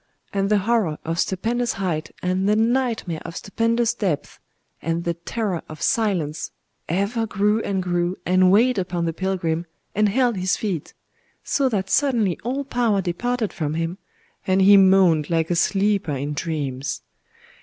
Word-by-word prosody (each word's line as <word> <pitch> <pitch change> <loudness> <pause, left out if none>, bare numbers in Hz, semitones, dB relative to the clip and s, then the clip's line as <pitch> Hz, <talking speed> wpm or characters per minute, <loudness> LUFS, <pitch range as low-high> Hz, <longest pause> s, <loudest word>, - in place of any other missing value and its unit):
And 195 0 0
the 210 - +4
horror 200 -6 +1
of 165 +1 -2
stupendous 235 +6 0
height, 175 -5 -2
and 185 +2 +1
the 210 - +4
nightmare 225 -7 0
of 165 - -8
stupendous 230 +3 0
depth, 190 -11 -3 0.4
and 165 +1 -1
the 170 - 0
terror 180 +2 -3
of 155 - -9
silence, 175 -9 0 0.4
ever 200 +6 0
grew 210 +2 +1
and 190 -3 -1
grew, 175 0 -1
and 185 0 +4
weighed 225 +4 +4
upon 175 -2 -2
the 165 - -1
pilgrim, 175 -2 -2 0.3
and 210 +1 +3
held 240 0 +2
his 185 0 +1
feet,—so 215 - -4
that 195 -4 -2
suddenly 235 - +2
all 260 +5 -2
power 240 -6 +1
departed 220 +5 -2
from 155 -3 -2
him, 165 +3 -3 0.5
and 190 0 +3
he 200 +1 +8
moaned 185 -6 +5
like 165 0 0
a - - +2
sleeper 195 -1 +1
in 140 +2 -3
dreams. 145 -4 -3
190 Hz, 155 wpm, -23 LUFS, 170-220 Hz, 0.5 s, he